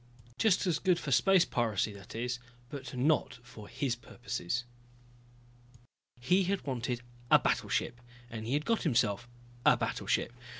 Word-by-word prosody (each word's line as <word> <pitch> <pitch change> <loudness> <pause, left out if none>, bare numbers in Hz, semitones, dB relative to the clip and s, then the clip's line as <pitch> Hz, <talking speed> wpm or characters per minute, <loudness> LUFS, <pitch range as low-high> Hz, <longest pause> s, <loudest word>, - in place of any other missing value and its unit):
Just 205 -3 +3
as 170 -5 +1
good 185 -2 +3
for 150 - -4
space 185 +7 +5
piracy, 110 -3 0
that 100 +1 -11
is 120 +2 -2 0.3
but 130 -3 -6
not 140 0 +2
for 110 -4 -11
his 130 -4 -1
purposes. 120 -2 -4 1.6
He 180 +10 +3
had 195 +1 -1
wanted 125 -2 -2 0.3
a - - +9
battleship, 120 0 0 0.3
and 115 -2 -6
he 125 - -1
had 150 +1 0
gotten 230 -1 +1
himself 120 -2 +1 0.3
a - - +6
battleship. - - -1
125 Hz, 140 wpm, -32 LUFS, 120-150 Hz, 1.6 s, a